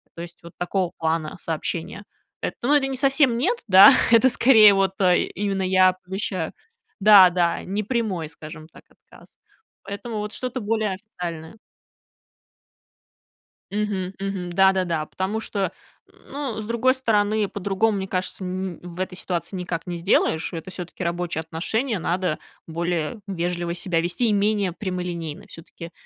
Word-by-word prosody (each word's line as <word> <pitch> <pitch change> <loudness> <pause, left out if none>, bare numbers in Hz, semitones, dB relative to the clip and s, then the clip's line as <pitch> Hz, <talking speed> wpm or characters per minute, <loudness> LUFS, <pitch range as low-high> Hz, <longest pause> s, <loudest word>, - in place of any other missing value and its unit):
То 170 - -7
есть 170 0 -10
вот 170 - -12
такого 180 0 -1
плана 160 0 -2
сообщение. 165 +4 -4 0.4
Эт - - -3
ну, 280 +5 +3
это 275 -2 +3
не 265 - -3
совсем 270 -2 +3
нет, 380 - 0
да, 190 +1 +9 0.2
это 235 +3 +6
скорее 220 -5 +7
вот, 195 -1 +1
э, 180 -2 +4 0.2
именно 195 -1 -1
я 185 0 +4
помещаю 185 -3 -3 0.5
Да, 200 -3 +8
да, 175 -1 0
не 200 +3 -3
прямой, 205 -9 -2
скажем 155 -1 -11
так, - - -17
отказ. - - -21 0.5
Поэтому 205 +3 -6
вот 210 +1 -4
что-то 255 0 -4
более 215 -1 0
официальное. 175 -3 -8 2.1
Мгм, 200 -3 -2
мгм, 195 -2 -4
да-да-да, 185 -4 +2
потому 190 +7 -3
что, 200 -4 -2 0.6
ну, 275 -6 -4
с 215 - -5
другой 235 +3 +2
стороны, 215 -4 +1
по-другому, 200 +2 0
мне 190 0 -4
кажется, 185 +1 -4
ни 185 -1 -4
в 175 0 -9
этой 185 0 -3
ситуации 180 +1 -4
никак 180 -1 -4
не 175 - -3
сделаешь. 165 -2 +1
Это 165 +1 -7
всё-таки 180 -2 -7
рабочие 170 -1 -2
отношения, 195 - -2
надо 175 -1 -1 0.3
более 170 +4 -2
вежливо 175 -2 -2
себя 175 -2 -1
вести 180 +8 0
и 215 - +2
менее 205 -3 +1
прямолинейно. 180 -5 -5
Всё-таки 165 0 -11
190 Hz, 145 wpm, -23 LUFS, 175-210 Hz, 2.1 s, да